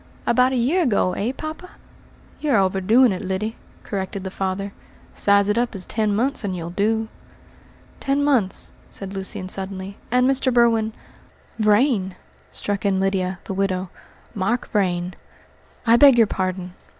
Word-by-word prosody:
"About 250 Hz, +2 st, +3 dB
a -, -, -1 dB
year 265 Hz, +10 st, +2 dB
ago, 205 Hz, -, +2 dB
eh, 225 Hz, +5 st, -1 dB
poppa?" 315 Hz, +5 st, -7 dB, 0.7 s
"You 295 Hz, -3 st, 0 dB
are -, -, +5 dB
overdoing 195 Hz, +6 st, +4 dB
it, 185 Hz, -, -3 dB
Lyddy," 190 Hz, +4 st, -2 dB, 0.3 s
corrected 195 Hz, -1 st, -4 dB
the 190 Hz, -, -5 dB
father. 195 Hz, +1 st, -3 dB, 0.4 s
"Size 200 Hz, 0 st, +4 dB
it 210 Hz, +3 st, +2 dB
up 240 Hz, -3 st, -1 dB
as 185 Hz, -2 st, -1 dB
ten 215 Hz, -2 st, 0 dB
months, 255 Hz, +5 st, 0 dB
and 190 Hz, -2 st, -2 dB
you'll 170 Hz, -1 st, -5 dB
do." 220 Hz, +4 st, 0 dB, 0.9 s
"Ten 280 Hz, +1 st, 0 dB
months," 250 Hz, -10 st, +2 dB, 0.2 s
said 195 Hz, -1 st, -6 dB
Lucian 190 Hz, -1 st, -6 dB
suddenly, 190 Hz, +1 st, -5 dB
"and 250 Hz, +1 st, +3 dB
Mr. 270 Hz, -1 st, +2 dB
Berwin 230 Hz, -2 st, +3 dB, 0.4 s
" -, -, -30 dB
"Vrain!" 210 Hz, -3 st, +2 dB, 0.4 s
struck 205 Hz, -1 st, -3 dB
in 195 Hz, -2 st, +1 dB
Lydia, 190 Hz, -1 st, 0 dB
the -, -, -5 dB
widow, 190 Hz, -1 st, -1 dB, 0.4 s
"Mark 220 Hz, +5 st, -1 dB
Vrain." 180 Hz, -4 st, 0 dB, 0.7 s
"I 230 Hz, 0 st, +6 dB
beg 275 Hz, -2 st, +7 dB
your 230 Hz, -, +6 dB
pardon! 185 Hz, -2 st, -3 dB
200 Hz, 155 wpm, -22 LUFS, 190-240 Hz, 0.9 s, beg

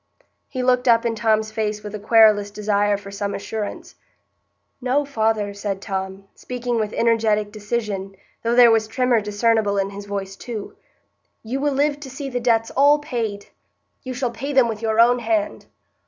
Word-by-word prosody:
He 255 Hz, -1 st, -4 dB
looked 250 Hz, 0 st, +2 dB
up 230 Hz, 0 st, +4 dB
in 230 Hz, -, +1 dB
Tom's 220 Hz, -1 st, +1 dB
face 210 Hz, -1 st, -2 dB
with 210 Hz, 0 st, -7 dB
a 210 Hz, -, -5 dB
querulous 215 Hz, -1 st, +5 dB
desire 205 Hz, 0 st, 0 dB
for 200 Hz, 0 st, -11 dB
some 200 Hz, 0 st, -3 dB
assurance. 210 Hz, +1 st, -5 dB, 0.9 s
"No, 260 Hz, +3 st, +1 dB
father," 220 Hz, -6 st, 0 dB
said 200 Hz, -1 st, -4 dB
Tom, 190 Hz, -1 st, -5 dB
speaking 245 Hz, -1 st, -3 dB
with 215 Hz, -1 st, -1 dB
energetic 220 Hz, -3 st, +1 dB
decision, 205 Hz, -2 st, -4 dB, 0.3 s
though 230 Hz, +1 st, 0 dB
there 240 Hz, -1 st, +8 dB
was 220 Hz, -1 st, +2 dB
tremor 245 Hz, 0 st, +1 dB
discernible 210 Hz, 0 st, +1 dB
in 195 Hz, 0 st, 0 dB
his 200 Hz, 0 st, -9 dB
voice 195 Hz, -1 st, -4 dB
too, 220 Hz, -1 st, -7 dB, 0.7 s
"you 245 Hz, +5 st, -3 dB
will 290 Hz, 0 st, 0 dB
live 290 Hz, +1 st, +1 dB
to 285 Hz, -2 st, -9 dB
see 275 Hz, +1 st, -6 dB
the 245 Hz, -, -1 dB
debts 230 Hz, -2 st, +1 dB
all 285 Hz, +2 st, +5 dB
paid. 230 Hz, -9 st, -4 dB, 0.5 s
You 255 Hz, -1 st, -6 dB
shall 250 Hz, -1 st, -1 dB
pay 275 Hz, +5 st, -5 dB
them 260 Hz, -3 st, +5 dB
with 220 Hz, -1 st, -4 dB
your 220 Hz, -1 st, 0 dB
own 245 Hz, +1 st, +5 dB
hand." 315 Hz, +3 st, -1 dB
225 Hz, 175 wpm, -22 LUFS, 205-245 Hz, 0.9 s, there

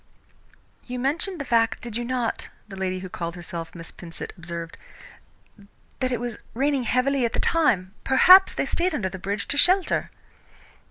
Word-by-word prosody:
"You 250 Hz, 0 st, -4 dB
mentioned 310 Hz, +8 st, -1 dB
the 280 Hz, -, -4 dB
fact, 230 Hz, -2 st, +1 dB
did 235 Hz, -2 st, -6 dB
you 240 Hz, -, -2 dB
not," 245 Hz, -1 st, -2 dB, 0.2 s
the 200 Hz, -, -9 dB
lady 185 Hz, -1 st, -3 dB
who 185 Hz, -, -6 dB
called 170 Hz, -1 st, -5 dB
herself 170 Hz, -1 st, -7 dB
Miss 165 Hz, -1 st, -9 dB
Pinsent 170 Hz, -2 st, -8 dB
observed, 170 Hz, -2 st, -7 dB, 1.2 s
"that 255 Hz, -1 st, 0 dB
it 245 Hz, -, -1 dB
was 240 Hz, -1 st, -5 dB, 0.2 s
raining 275 Hz, 0 st, +1 dB
heavily 260 Hz, +2 st, +1 dB
at 235 Hz, -, 0 dB
the -, -, -1 dB
time? 210 Hz, -, +2 dB
Perhaps 365 Hz, +9 st, +7 dB
they -, -, 0 dB
stayed 350 Hz, -1 st, 0 dB
under 190 Hz, -9 st, -1 dB
the 190 Hz, -, -8 dB
bridge 200 Hz, +2 st, -3 dB
to 285 Hz, -, 0 dB
shelter." 365 Hz, +4 st, +3 dB
235 Hz, 170 wpm, -24 LUFS, 185-275 Hz, 1.2 s, Perhaps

